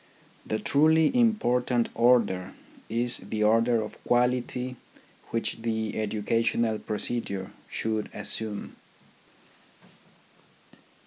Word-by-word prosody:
The 110 Hz, -, -1 dB
truly 160 Hz, -, +3 dB
important 125 Hz, -, +2 dB
order 115 Hz, -7 st, +2 dB, 0.4 s
is 120 Hz, +2 st, +1 dB
the 110 Hz, -1 st, -3 dB
order 115 Hz, +1 st, +3 dB
of 105 Hz, -, -10 dB
quality 125 Hz, +1 st, 0 dB, 0.5 s
which 115 Hz, 0 st, -3 dB
the 110 Hz, -2 st, -2 dB
educational 110 Hz, +1 st, 0 dB
procedure 105 Hz, -3 st, -4 dB, 0.2 s
should 110 Hz, -1 st, -2 dB
assume. 105 Hz, 0 st, +1 dB
115 Hz, 80 wpm, -27 LUFS, 110-125 Hz, 0.5 s, truly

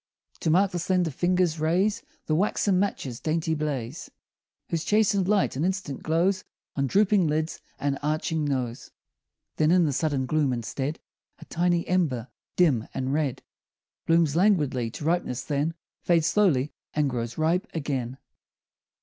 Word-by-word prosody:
To -, -, -1 dB
mark 190 Hz, +4 st, +4 dB
the 175 Hz, -, -2 dB
slender 180 Hz, -1 st, +1 dB
fingers 175 Hz, +1 st, +1 dB
raise 185 Hz, +7 st, +1 dB, 0.2 s
The 155 Hz, -, 0 dB
waxen 190 Hz, +2 st, +2 dB
match's 135 Hz, -11 st, -2 dB
dainty 160 Hz, 0 st, -1 dB
blaze, 150 Hz, -3 st, -3 dB, 0.6 s
Whose 165 Hz, -2 st, -1 dB
chastened 205 Hz, -3 st, +2 dB
light 200 Hz, -7 st, +2 dB
an 140 Hz, -, -1 dB
instant 185 Hz, -7 st, -2 dB
glows 180 Hz, +4 st, +1 dB, 0.3 s
On 140 Hz, -1 st, 0 dB
drooping 200 Hz, -, +3 dB
lids 155 Hz, +2 st, -1 dB, 0.2 s
and 140 Hz, -1 st, -1 dB
arching 155 Hz, +1 st, -1 dB
nose, 130 Hz, -5 st, -2 dB, 0.7 s
Then, 155 Hz, 0 st, +3 dB
in 175 Hz, 0 st, +5 dB
the 145 Hz, -, 0 dB
sudden 140 Hz, -1 st, 0 dB
gloom, 145 Hz, -1 st, +1 dB
instead, 130 Hz, +6 st, -3 dB, 0.4 s
A -, -, -13 dB
tiny 175 Hz, 0 st, 0 dB
ember, 140 Hz, -10 st, 0 dB, 0.3 s
dim 140 Hz, -11 st, +3 dB
and 130 Hz, +1 st, -1 dB
red, 145 Hz, -4 st, -1 dB, 0.6 s
Blooms 165 Hz, -3 st, +3 dB
languidly 150 Hz, -, +2 dB
to 145 Hz, -, -8 dB
ripeness, 160 Hz, -7 st, 0 dB
then 150 Hz, +2 st, -1 dB, 0.3 s
Fades 170 Hz, -3 st, +2 dB
slowly, 165 Hz, -7 st, +2 dB, 0.2 s
and 150 Hz, -1 st, +2 dB
grows 120 Hz, -2 st, -3 dB
ripe 170 Hz, +7 st, +1 dB
again. 135 Hz, -5 st, -3 dB
155 Hz, 145 wpm, -26 LUFS, 140-180 Hz, 0.7 s, in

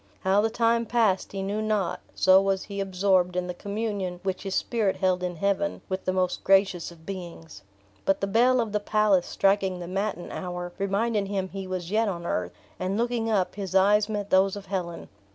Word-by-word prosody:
How 195 Hz, +2 st, +3 dB
the 225 Hz, -, +1 dB
time 230 Hz, 0 st, +1 dB
passed 220 Hz, -6 st, +1 dB
he 195 Hz, -1 st, -4 dB
knew 205 Hz, +2 st, -2 dB
not, 205 Hz, -5 st, 0 dB, 0.2 s
so 190 Hz, +1 st, +6 dB
was 195 Hz, -1 st, 0 dB
he 200 Hz, -1 st, -6 dB
absorbed 185 Hz, -2 st, +1 dB
in 180 Hz, 0 st, 0 dB
the 180 Hz, -, -4 dB
communion 200 Hz, -2 st, -3 dB
which 190 Hz, -1 st, -2 dB
his 195 Hz, -1 st, -3 dB
spirit 215 Hz, -5 st, 0 dB
held 185 Hz, -1 st, +1 dB
in 180 Hz, -1 st, -3 dB
heaven 200 Hz, +2 st, -1 dB
with 190 Hz, 0 st, -3 dB
the 185 Hz, -, +1 dB
most 185 Hz, -1 st, -1 dB
gracious 195 Hz, -3 st, +3 dB
of 160 Hz, -1 st, -16 dB
beings. 170 Hz, -, -8 dB, 0.4 s
But 195 Hz, 0 st, +2 dB
the -, -, 0 dB
bell 240 Hz, +5 st, +3 dB
of 225 Hz, -3 st, -1 dB
the 210 Hz, -, +1 dB
palace 205 Hz, -3 st, +2 dB
striking 195 Hz, -2 st, +1 dB
the 175 Hz, -, -6 dB
matin 195 Hz, 0 st, -3 dB
hour, 180 Hz, -1 st, -5 dB
reminded 200 Hz, +1 st, 0 dB
him 195 Hz, -1 st, -2 dB
he 195 Hz, 0 st, -6 dB
was 185 Hz, -1 st, -4 dB
yet 220 Hz, +1 st, +2 dB
on 170 Hz, -3 st, -4 dB
earth; 90 Hz, -, -2 dB, 0.3 s
and 185 Hz, +2 st, -1 dB
looking 235 Hz, -1 st, 0 dB
up 195 Hz, -4 st, +1 dB
his 195 Hz, -2 st, -5 dB
eyes 205 Hz, +2 st, +4 dB
met 205 Hz, -2 st, -3 dB
those 190 Hz, +1 st, +4 dB
of 200 Hz, -1 st, -8 dB
Helen. 180 Hz, -3 st, -4 dB
195 Hz, 205 wpm, -26 LUFS, 185-205 Hz, 0.4 s, so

